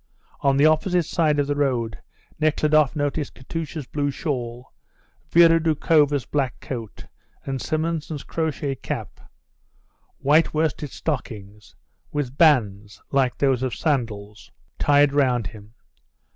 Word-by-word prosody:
On 135 -1 +2
the 145 - +5
opposite 170 +2 +2
side 155 -3 +1
of 145 - +2
the 145 - -1
road 125 -6 -1 0.4
Nekhludoff 155 -1 +2
noticed 145 0 -2
Katusha's 155 +2 -6
blue 145 +2 -2
shawl, 125 -4 -4 0.6
Vera 165 -1 +6
Doukhova's 150 -3 +2
black 135 -5 -2
coat, 115 -6 -7 0.4
and 135 -2 -3
Simonson's 155 -2 -2
crochet 155 -3 -2
cap, 135 - -6 1.0
white 155 +3 +3
worsted 155 -2 -1
stockings, 105 - -6 0.4
with 140 -3 -3
bands, 105 - +2
like 130 -3 +1
those 135 -3 +1
of 130 -4 -2
sandals, 105 -8 -3 0.3
tied 145 -1 +4
round 125 -5 +2
him. 105 +4 -10
145 Hz, 115 wpm, -23 LUFS, 125-155 Hz, 1.0 s, Vera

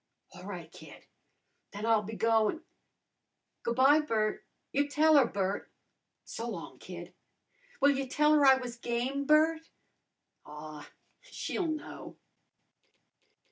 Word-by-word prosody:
"A' 180 -1 -12
right, 175 -5 -8
kid. - - -14 0.7
Then 205 +2 -5
I'll 225 -2 +3
be 215 +2 -7
goin' 225 +8 +1 0.5
" - - -54
"Goo' 235 - -2
by, 270 +4 +6
Bert. 220 -8 -1 0.3
You 285 +1 +1
tell 310 +2 +4
her, 275 -5 +6
Bert." 195 -1 -2 0.6
"So - - -5
long, - - -8
kid." - - -9 0.7
"Will 285 +1 +5
ya 270 0 -2
tell 300 +2 +3
her 295 -1 +4
I 265 -1 +8
was 250 -2 -6
game, 245 +4 -2
Bert?" 315 +2 +3 0.7
"Aw, 150 0 -10 0.3
she'll 365 - -4
know!" 310 -1 -6
255 Hz, 130 wpm, -30 LUFS, 215-300 Hz, 0.7 s, I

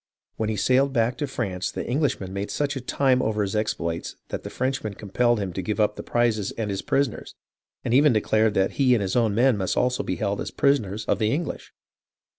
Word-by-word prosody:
When 110 -1 -1
he 110 - -1
sailed 130 +7 +2
back 120 0 +2
to 145 - -1
France 95 -8 -3
the - - -5
English 140 +1 0
men 95 -1 -7
made 100 +1 -3
such 145 -1 -1
a 135 - -4
time 130 0 +2
over 110 -1 0
his 100 +1 -3
exploits 85 -6 -2
that - - -4
the - - -7
French 130 +1 -2
men 105 -2 -4
compelled 120 +3 +1
him 100 -2 -3
give 95 +4 -3
up 105 0 +2
the - - -6
prizes 115 -4 0
and 110 -3 -3
his 95 - -2
prisoners, 135 -5 -1 0.5
and 115 - 0
even 145 +3 +6
declared 110 -1 +2
that 95 0 +2
he 130 -2 +5
and 110 - 0
his 95 - -2
own 115 -4 +2
men 125 0 +4
must 95 -2 -1
also 125 0 +1
be 90 - -2
held 100 +2 -2
as - - -4
prisoners 110 -7 +1
of 100 - 0
the 110 -1 +2
English. 160 +4 -3
110 Hz, 230 wpm, -25 LUFS, 100-130 Hz, 0.5 s, even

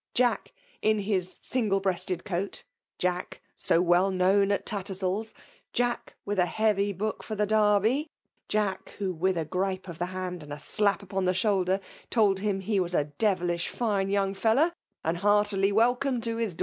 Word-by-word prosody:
Jack, 245 -3 +2 0.3
in 215 0 +3
his 195 -3 -1
single 215 -6 0
breasted 185 -2 -2
coat,*— 195 0 -3 0.3
Jack, 180 0 -2 0.2
so 165 - +2
well 175 +2 +4
known 195 +2 +3
at 200 - 0
TattersaU's, 195 +1 -3 0.2
— - - -35
Jack, 245 0 -1
with 205 -1 -1
a 180 - +4
heavy 210 -1 +1
book 210 +3 -3
for 215 - -5
the 210 0 +1
Derby, 215 +7 +3 0.2
— - - -49
Jade, 210 -2 -1
who, 195 -2 -1
with 180 +2 0
a 160 - -1
grii>e 185 +3 -2
of 170 -2 -8
the 175 - -1
hand 185 -1 -5
and 150 -1 -11
a 145 - -4
slap 200 +5 +1
upon 190 0 -2
ibe 185 0 +2
shoulder, 190 -1 +2 0.3
told 205 -5 +3
him 200 -1 -1
he 200 +1 0
was 180 -1 -1
a - - +3 0.2
devilish 175 -5 +1
fine 205 -5 0
young 195 -1 +1
fellow« 230 - +3 0.3
and 165 +2 0
heartily 205 0 +3
welcome 245 +4 +2
to 230 0 -2
his. 225 -7 -1
195 Hz, 180 wpm, -28 LUFS, 185-215 Hz, 0.3 s, well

